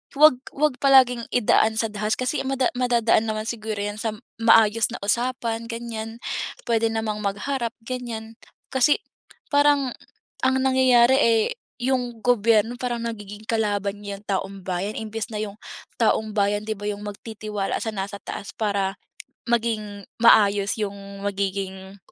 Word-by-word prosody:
'wag 295 -3 +6 0.2
'wag 290 -2 +1
palaging 255 -4 +5
idaan 220 -2 +3
sa 225 0 +1
dahas 210 +1 -1
kasi 255 +4 -1
mada 265 -1 +1
madadaan 235 -3 +2
naman 215 0 -2
siguro 220 -2 -3
yan 205 +1 -3
sa 220 -1 -2
m - - -15 0.2
maayos 225 -1 +5
na - - -5
usapan 230 +1 -1
ganiyan, 230 -1 -6 0.5
puwede 230 -1 +2
namang 220 -1 -2
magharap 235 +4 -2
ganiyan, 230 -2 -5 0.4
kasi 265 +3 +3 0.5
parang 285 -2 +4 0.5
ang 260 0 +3
nangyayari, 260 -1 +5
eh, 225 -4 +4 0.4
yung 245 -3 -1
gobyerno 230 -1 +3
parang 240 -2 -2
nagiging 210 -2 -7
kalaban 205 -3 0
niya 200 -1 -6
taumbayan 195 0 -3
imbes 220 +1 -4
na 215 - -5
yung 205 -1 -5 0.4
taumbayan 210 -2 +1
di 220 - -1
ba 205 +1 -5
yung 205 0 -5
magtitiwala 210 -1 -4
sa 220 - -2
nasa 200 0 -4
taas 200 - -7
para 200 -2 -1 0.5
maging 215 -4 -1 0.2
maayos 205 -3 +5
yung 200 -1 -2 0.3
magiging 195 -1 -3
220 Hz, 135 wpm, -24 LUFS, 205-240 Hz, 0.5 s, wag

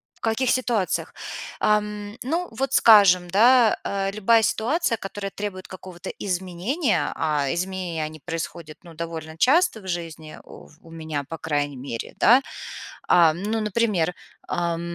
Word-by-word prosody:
В - - -30
каких 230 +3 +1
ситуациях. 235 -7 0 0.5
Ам, 210 0 0
ну, 335 +7 -2
вот, 265 +4 -3
скажем, 195 -8 +6
да, 235 +4 +5
а, 195 0 -1
любая 220 +3 +3
ситуация, 235 +4 0
которая 195 0 -6
требует 195 -2 -6
какого-то 185 -1 -9
изменения, 190 - -1
а 150 -4 0
изменения 180 -3 -3
они 155 0 -8
происходят, 165 -1 -6
ну, 170 -2 -13
довольно 160 -1 -6
часто 275 - +3
в 190 - -12
жизни 165 -3 -5
у - - -14
в 155 - -21
у 165 - -14
меня, 160 -3 -4
по 165 +4 -7
крайней 145 -3 -2
мере, 125 -3 -6
да. 245 +4 +6 0.7
А, 165 -3 +6
ну 210 +6 -2
например, 205 -5 0 0.3
ам, 170 -1 -1
185 Hz, 145 wpm, -24 LUFS, 165-220 Hz, 0.7 s, скажем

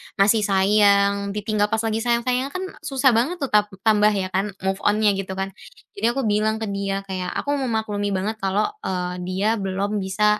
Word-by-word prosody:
masih 210 +2 +4
sayang, 200 0 +3
ditinggal 210 0 0
pas 220 +1 -1
lagi 220 0 0
sayang-sayangnya 245 +3 0
kan 370 - -2 0.2
susah 265 -2 +2
banget 275 +8 0
tap 210 0 +4 0.2
tambah 210 -2 +4
ya 185 -1 -2
kan, 195 +1 -1
move 190 +1 -1
on-nya 210 0 +3
gitu 190 -1 -5
kan. 195 0 -3 0.5
Jadi 220 - 0
aku 270 - -1
bilang 215 +1 +1
ke 220 - -3
dia 195 0 -2
kayak, 185 -2 -4 0.2
"Aku 285 - -2
memaklumi 220 -5 -1
banget 215 +4 -2
kalo, 195 - 0 0.2
eee, 180 -1 -3
dia 205 +4 0
belum 200 +2 -2
bisa 210 +2 +1
205 Hz, 180 wpm, -22 LUFS, 195-220 Hz, 0.5 s, masih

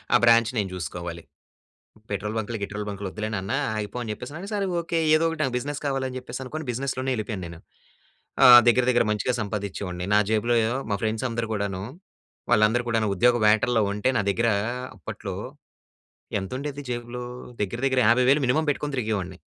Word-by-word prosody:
ఆ - - +9
బ్రాంచ్ 115 -1 +5
నేను 100 -3 0
జూసుకోవాలి. 85 -1 -5 0.9
"పెట్రోల్ 105 +1 -3
బంకులు, 110 +1 -3
గిట్రోల్ 105 +1 -4
బంకులు 100 -1 -4
వద్దులే 110 +2 -4
నాన్న 95 -1 -3 0.2
ఆగిపో" 105 +3 -4
అని 110 - -5
చెప్పేసి 125 +6 -8
అన్నాడు. 175 +6 -7
సరే 200 -1 0
ఓకే. 170 0 -2 0.2
ఏదో 155 +1 +3
ఒకటి 165 -1 -5
నాకు 130 -4 0
బిజినెస్ 145 +4 -3
కావాలి 135 -1 -1
అని 130 - -7
చెప్పేసనుకోని 130 +5 -6
బిజినెస్‌లోనే 130 +1 -2
వెళ్ళిపోయాను 110 -4 -4
నేను. 85 0 -9 0.9
ఆహ్, 120 -1 +11
దగ్గర, 120 +1 +5
దగ్గర 120 -3 +3
మంచిగా 105 +4 0
సంపాదిచ్చేవాడిని. 100 -3 -4
నా - - +6
జేబులో 115 +2 +2 0.4
మా 100 - +1
ఫ్రెండ్స్ 110 +2 -1
అందరూ 115 -1 -3
గూడాను, 100 -3 -2 0.7
వాళ్ళందరూ 110 +3 +4
కూడాను 110 -2 +1
ఉద్యోగ 120 +5 +4
వేటల్లో 110 +2 +3
ఉంటే 105 +4 0
నా - - 0
దగ్గర 115 +4 +1 0.5
అప్పట్లో 90 - -6 1.1
ఎంతుండేది 135 +8 -5
జేబులో? 120 0 -4 0.4
దగ్గర, 105 +4 -3
దగ్గర 130 -1 +2
50,000 125 +5 +4
మినిమమ్ 150 +5 +1
పెట్టుకొని 145 0 -3
తిరిగేవాడిని. 100 -6 -2
115 Hz, 165 wpm, -25 LUFS, 105-130 Hz, 1.1 s, ఆహ్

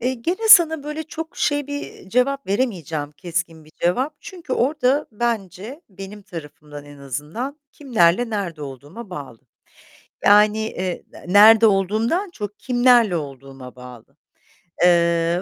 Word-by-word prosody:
Eee, 250 +2 0
gene 360 - -3
sana 325 -7 +7
böyle 300 +2 -5
çok 320 +2 -8
şey 290 -1 0
bir, 285 0 -4
eee, - - -12
cevap 265 +5 0
veremeyeceğim, 170 - -2
keskin 170 -1 -5
bir 155 - -20
cevap. 255 - 0
Çünkü 350 -8 -9
orada 270 +2 +1
bence, 220 - -4
benim 195 +1 -11
tarafımdan 150 -4 -10
en 145 -1 -14
azından 150 - -6
kimlerle 230 - +1
nerede 180 -8 -4
olduğuma 145 - -10
bağlı. 140 -9 -8 0.9
Yani, 210 +1 +5
eee, 185 -4 -5 0.2
nerede 220 +3 +7
olduğumdan 220 - 0
çok 210 - -7
kimlerle 245 -6 +3
olduğuma 135 -3 -9
bağlı. 125 -2 -14 0.7
Eee, 170 0 +3
205 Hz, 130 wpm, -21 LUFS, 165-255 Hz, 0.9 s, sana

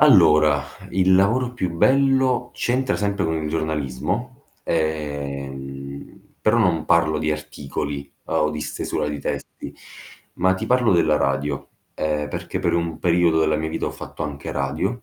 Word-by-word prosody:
Allora, 75 - +6 0.3
il 95 0 +3
lavoro 115 +6 +3
più 95 -8 -2
bello, 130 +3 +3
c'entra 130 +2 0
sempre 100 -1 -1
con 80 0 0
il 80 -1 -2
giornalismo. 75 -5 -2 0.3
Ehm, 70 -3 -4 0.2
però 110 +2 +3
non 85 -8 +2
parlo 85 -2 +3
di 75 0 0
articoli 75 -2 -4
o 75 - +1
di 75 0 -4
stesura 75 - -2
di 75 -1 -4
testi, - - -5 0.6
ma 95 +1 +2
ti 95 - -4
parlo 125 -2 +3
della 80 -3 +4
radio, 70 0 -1 0.3
ehm, 75 -1 -1
perché - - -4
per - - +1
un 85 -1 -1
periodo 85 -2 +3
della 80 -1 +2
mia 80 +1 -2
vita - - -2
ho - - -1
fatto - - -8
anche 70 -2 -5
radio. 80 - -2
80 Hz, 150 wpm, -22 LUFS, 75-95 Hz, 0.6 s, Allora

